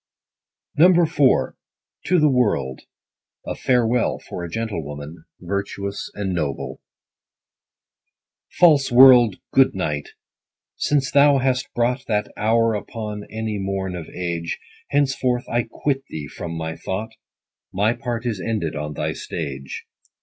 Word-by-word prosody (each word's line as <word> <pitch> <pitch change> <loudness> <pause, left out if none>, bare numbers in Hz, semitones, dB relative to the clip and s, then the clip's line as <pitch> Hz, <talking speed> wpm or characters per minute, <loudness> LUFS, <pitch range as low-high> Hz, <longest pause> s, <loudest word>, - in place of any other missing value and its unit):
100 175 +2 +6
IV. - - -16
— 135 -3 -1
TO 180 0 +4
THE 155 - +5
WORLD. 105 - +1 0.6
A - - -3
Farewell 125 -2 +1
for 90 - -8
a 85 - -5
Gentlewoman, 80 -7 -5
virtuous 100 +2 -4
and 100 -2 -2
noble. 75 -6 -3 1.7
False 150 -7 +4
world, 120 -4 +8 0.2
good 135 -5 +4
night! 75 -6 -2 0.7
since 135 -3 0
thou 140 0 +6
hast 130 -1 0
brought 125 +2 +1
That 105 -2 -1
hour 115 +1 +2
upon 105 -1 -5
any 110 -1 -4
morn 95 -1 -3
of 85 -3 -7
age, 85 -2 -3 0.3
Henceforth 135 -3 +1
I 120 0 -1
quit 135 +1 -1
thee 75 -2 -6
from 85 +4 -6
my 80 0 -4
thought, 105 +4 -4 0.6
My 105 +4 +2
part 120 -2 -4
is 110 -6 -2
ended 105 -9 -2
on 75 0 -4
thy - - -2
stage. 70 -4 -6
110 Hz, 130 wpm, -22 LUFS, 85-125 Hz, 1.7 s, world